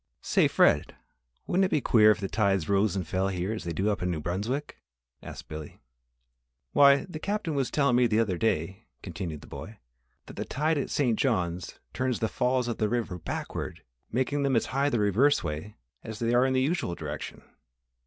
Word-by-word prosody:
"Say, - - +3
Fred, - - +3 0.5
wouldn't 190 +2 +2
it - - -1
be 150 - +2
queer 110 -4 +5
if 105 -1 +3
the 100 - -2
tides 95 -6 +1
rose 100 0 +2
and 90 -4 -3
fell 95 +2 0
here 95 +2 -2
as 110 - -6
they 85 - -2
do 95 +6 0
up 100 - -3
in 90 - 0
New 85 -3 -2
Brunswick?" 105 - -3 0.4
asked - - -9
Billy. 75 -1 -8 0.9
"Why, 140 -1 +6
the 170 -4 -8
Captain 200 -3 -2
was 135 -3 0
tellin' 140 -4 +2
me 125 0 +4
the 110 -1 +1
other 95 -6 0
day," 95 0 -1 0.2
continued 85 -4 -5
the - - -13
boy, 110 +2 -9 0.5
"that - - -12
the - - -2
tide 155 +2 0
at 135 - -3
St. 125 -6 +1
John 90 -10 +1 0.3
turns 130 -2 -1
the 110 - 0
Falls 125 +2 0
of 120 - -3
the 105 - +1
river 110 -6 -2
backward, 80 - -5 0.3
making 130 +4 0
them 135 -2 +1
as 115 - +2
high 140 +2 +2
the 120 - 0
reverse 105 +8 +3
way 80 +6 -5 0.3
as 110 -1 -7
they 115 +1 0
are 125 +2 +4
in 130 - 0
the 130 - +2
usual 145 - -1
direction. 75 -2 -7
110 Hz, 205 wpm, -28 LUFS, 95-130 Hz, 0.9 s, Why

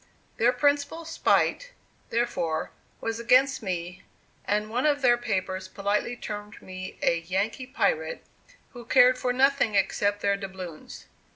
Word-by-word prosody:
Their 235 +2 +4
principal 290 +5 0
spite, - - +1 0.4
therefore, 175 -9 -1 0.3
was 225 0 -3
against 255 +3 +3
me; 180 -2 -4 0.4
and 210 +1 -1
one 250 +6 +1
of 290 -2 +1
their 240 -1 +6
papers 190 -5 -3
politely 205 +4 -1
termed 210 -2 -7
me 185 0 -8
a 170 - +3
"Yankee 200 +9 -2
pirate," 180 - -1 0.5
who 245 -2 -10
cared 250 +1 +5
for 250 -1 0
nothing 265 -3 +2
except 205 +1 +1
their 200 0 +2
doubloons. 190 -5 -8
220 Hz, 130 wpm, -27 LUFS, 190-255 Hz, 0.5 s, their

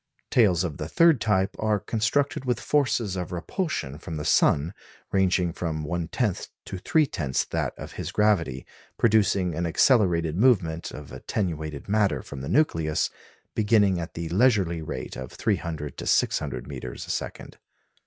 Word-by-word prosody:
Tails 95 -7 +4
of 80 -5 -4
the - - -4
third 165 -6 +4
type 95 -3 +1
are 110 -1 +1
constructed 130 +8 0
with 125 -2 0
forces 120 -9 +1
of 90 -1 -4
repulsion 90 - -3
from 80 -1 -6
the 75 - -4
sun 75 +6 +3 0.4
ranging 90 -3 +2
from 80 -3 -3
one 85 +2 -2
tenth 105 +1 -1 0.2
to 95 - -6
three 155 - +3
tenths 70 - -1
that - - -3
of - - -8
his - - -5
gravity, 85 - +1 0.3
producing 100 -5 +3
an 85 +2 -1
accelerated 85 - +3
movement 90 -7 +2
of 75 -2 -10
attenuated 80 -7 -4
matter 105 -1 +1
from 70 -1 -8
the 70 - -5
nucleus, 80 - +1 0.4
beginning 105 -4 +3
at 85 - -6
the 85 0 -4
leisurely 95 -4 +2
rate 80 - -6
of 65 -1 -7
300 75 -3 -2
to - - -5
600 - - +1
metres 60 -1 -7
a - - -4
second. - - -5
90 Hz, 155 wpm, -26 LUFS, 80-110 Hz, 0.4 s, Tails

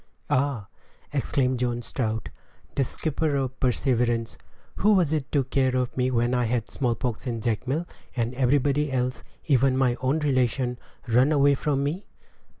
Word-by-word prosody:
"Ah!" 130 -5 +1 0.5
exclaimed 130 -2 0
John 120 -1 -1
Strout, 110 -3 -3 0.4
the 140 - +2
skipper 155 +2 -1
of 135 -2 0
the - - -33
Perseverance, 120 -2 +1 0.4
"who 210 +2 +4
was 175 -6 +3
it 150 -4 -2
took 135 -3 0
care 130 -2 +2
of 125 -1 -1
me 125 0 +1
when 120 0 +1
I 125 -1 +2
had 115 -1 0
the - - -18
smallpox 125 -1 -2
in 115 -2 -2
Jacmel, 125 +9 -1 0.3
and 120 -1 -1
everybody 140 +3 +2
else, 125 -1 -1 0.2
even 135 -2 +3
my 130 -2 +2
own 130 +4 +1
relation, 130 -4 0 0.3
run 125 +5 +4
away 145 -1 +5
from 140 0 0
me?" 160 +8 -3
130 Hz, 160 wpm, -26 LUFS, 120-140 Hz, 0.5 s, away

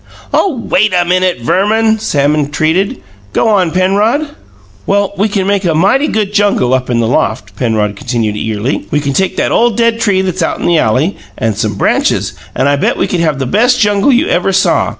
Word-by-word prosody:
"Oh, 320 -11 +1
WAIT 200 -1 +2
a 175 - +1
minute, 180 -5 0
Verman!" 220 - +1
Sam 145 -9 0
entreated. 155 +5 -1 0.3
"Go - - +1
on, 190 -5 +2
Penrod." 205 - +1 0.6
"Well, 200 0 +1
we 205 +3 0
can 195 -2 -1
make 200 0 0
a 170 -3 0
mighty 210 - +2
good 210 -2 -2
jungle 200 -12 +1
up 130 -1 -1
in 120 -1 0
the 115 - +1
loft," 115 0 -1
Penrod 110 -4 -1
continued 115 -3 -2
eagerly. 105 +1 -3
"We 150 - 0
can 140 -1 -2
take 190 +6 -1
that - - 0
ole 240 +1 +3
dead 230 0 0
tree 190 -4 +1
that's 185 -1 -3
out 165 - -1
in - - -4
the 170 -2 +3
alley 130 - 0 0.2
and 110 -2 -1
some 105 -1 -2
branches, - - 0 0.2
and 130 - +1
I 145 0 +2
bet - - 0
we - - +1
could 180 - -2
have 155 -4 0
the 135 - -2
best 245 - +2
jungle 205 +4 +2
you 260 +6 +2
ever - - +1
saw. - - +2
185 Hz, 210 wpm, -12 LUFS, 135-205 Hz, 0.6 s, ole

